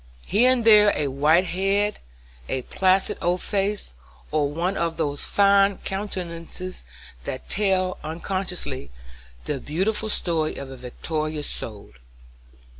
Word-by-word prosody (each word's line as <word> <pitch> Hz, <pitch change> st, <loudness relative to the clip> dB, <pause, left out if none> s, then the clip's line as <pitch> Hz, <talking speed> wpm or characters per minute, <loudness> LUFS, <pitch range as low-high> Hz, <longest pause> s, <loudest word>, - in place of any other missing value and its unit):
Here 245 Hz, +5 st, +4 dB
and 245 Hz, -3 st, +1 dB
there 210 Hz, -2 st, +8 dB
a 145 Hz, -2 st, 0 dB
white 150 Hz, +6 st, +4 dB
head, 195 Hz, +3 st, 0 dB, 0.5 s
a 130 Hz, -, -1 dB
placid 190 Hz, +5 st, +2 dB
old 175 Hz, +1 st, 0 dB
face, 200 Hz, -, -1 dB, 0.4 s
or 150 Hz, -2 st, +1 dB
one 175 Hz, +6 st, -1 dB
of 170 Hz, -2 st, -1 dB
those 145 Hz, -3 st, -1 dB
fine 200 Hz, 0 st, +4 dB
countenances 185 Hz, -2 st, -5 dB, 0.4 s
that 130 Hz, -, -5 dB
tell, 190 Hz, -2 st, +1 dB
unconsciously, 165 Hz, -, -3 dB, 0.6 s
the 145 Hz, -, -2 dB
beautiful 205 Hz, +10 st, -1 dB
story 165 Hz, -6 st, +1 dB
of 135 Hz, -1 st, -7 dB
a -, -, -7 dB
victorious 155 Hz, +4 st, -3 dB
soul. 105 Hz, -, -6 dB
180 Hz, 120 wpm, -24 LUFS, 150-195 Hz, 0.6 s, there